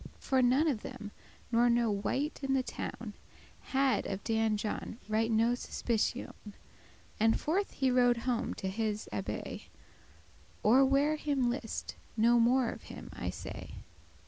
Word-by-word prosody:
*servants - - -15
For 265 -1 +4
none 260 +6 +4
of 255 -9 0
them, 210 -1 -8 0.4
nor 240 +1 +4
no 235 -2 +3
wight 265 +9 -1
in 270 -1 +1
the 260 - +2
town, - - -6 0.5
Had 270 -1 +1
of 195 0 -4
Dan 220 -1 +1
John 215 +1 -4
right 220 +1 +1
no 225 +2 +3
suspicioun; 235 -3 -2 0.7
And 225 +1 +3
forth 380 +6 0
he 265 -1 +1
rode 245 -1 +4
home 245 -2 0
to 190 - -4
his 210 +1 -2
abbay, - - -4 1.0
Or 250 +6 +6
where 280 +3 +3
him 275 -5 +1
list; 240 -3 -4 0.2
no 235 +2 +5
more 240 +1 +4
of - - -9
him - - -9
I - - -4
say. - - -7
240 Hz, 150 wpm, -32 LUFS, 220-265 Hz, 1.0 s, Or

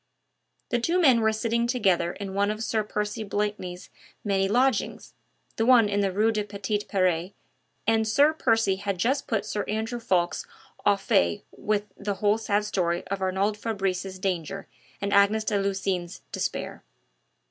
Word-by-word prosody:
The 240 - +1
two 335 +9 +1
men 260 -9 +5
were 220 0 +3
sitting 230 +2 0
together 190 -8 +1
in 200 -2 -6
one 200 +1 +1
of 215 +1 -3
Sir 220 -1 0
Percy 210 +1 -3
Blakeney's 205 -3 -3 0.3
many 195 -2 +1
lodgings 255 +6 0 0.4
the 225 - +1
one 245 -4 +7
in 205 0 0
the 195 -1 +1
Rue 215 +4 +2
des 215 -1 -1
Petits 205 +1 -3
Peres 185 -1 0 0.5
and 220 0 +2
Sir 285 +8 +4
Percy 225 -9 +2
had 200 -1 -3
just 260 +9 0
put 215 -3 -1
Sir 210 -1 -2
Andrew 220 +3 -2
Ffoulkes 175 -6 0 0.4
au 205 - +6
fait 85 - +1
with 210 -1 -1
the 200 0 -3
whole 210 +2 +2
sad 210 -1 0
story 175 -4 -1
of 200 0 -3
Arnould 195 +3 0
Fabrice's 195 -3 -2
danger 190 0 -3 0.3
and 200 0 -1
Agnes 200 +2 +4
de 210 -2 0
Lucines' 195 -3 -2
despair. - - -3
205 Hz, 160 wpm, -26 LUFS, 195-220 Hz, 0.5 s, one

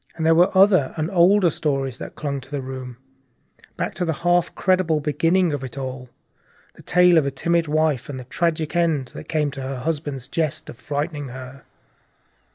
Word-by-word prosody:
There 160 0 +3
were 175 +3 +5
other 185 -8 +4
and 160 +4 -2
older 185 0 +4
stories 135 -5 -2
that - - -8
clung 140 -2 -3
to 130 - -15
the 140 -2 -4
room, 130 -2 -7 0.8
back - - -2
to 180 - -2
the 165 -2 0
half 175 0 +3
incredible 185 -4 +1
beginning 165 +4 +1
of 140 -2 -3
it 130 +1 -7
all, 130 -2 -6 0.6
the - - -16
tale 180 -1 +5
of 140 - -1
a - - +2
timid 165 +4 0
wife 150 -4 0
and 135 -2 -5
the - - -7
tragic 160 +4 -1
end 160 -7 +1
that - - -10
came 150 -3 0
to 135 -1 -7
her 135 0 -4
husband's 145 -2 -3
jest 155 0 -2
of 120 - -16
frightening 145 0 -3
her. 130 +1 -10
150 Hz, 185 wpm, -22 LUFS, 135-170 Hz, 0.8 s, were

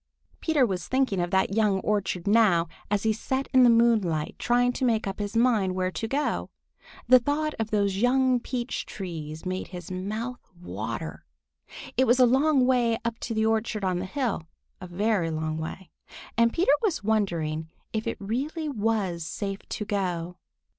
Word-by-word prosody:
Peter 305 -5 +3
was 185 -5 -3
thinking 260 -7 +1
of 175 - -1
that 190 +1 +1
young 210 -3 +2
orchard 200 -4 -1
now, 200 -6 +4 0.2
as 205 0 0
he 220 -1 +2
sat 265 +5 -2
in 260 - +7
the 245 - +7
moonlight 220 -10 +2
trying 245 0 +2
to 260 - -4
make 230 -3 +2
up 195 +1 -4
his 205 +1 -4
mind 225 -6 +3
where 185 0 0
to 225 - -3
go. 285 +5 -1 0.6
The 255 +1 +8
thought 295 +4 -1
of 220 -1 -1
those 200 -3 +1
young 255 +2 +3
peach 245 0 -4
trees 160 -5 -6
made 185 +1 -3
his 180 0 -8
mouth 215 +7 -4 0.2
water. 175 - -5 0.7
It 260 - +4
was 245 +2 +4
a 255 - +8
long 265 +2 +3
way 240 -3 +2
up 235 -1 -2
to 230 - -4
the 220 0 +2
orchard 220 -2 0
on 180 -1 0
the 185 - -3
hill, 215 - -2 0.3
a 185 - -7
very 190 -1 0
long 155 0 -2
way, 170 +3 -7 0.4
and 235 0 +4
Peter 335 -1 +3
was 370 - 0
wondering 170 -7 0 0.2
if 220 0 -2
it - - -2
really 275 - -3
was 210 - -1
safe 195 +4 -4
to 210 - -3
go. 180 -4 -2
215 Hz, 175 wpm, -26 LUFS, 185-245 Hz, 0.7 s, The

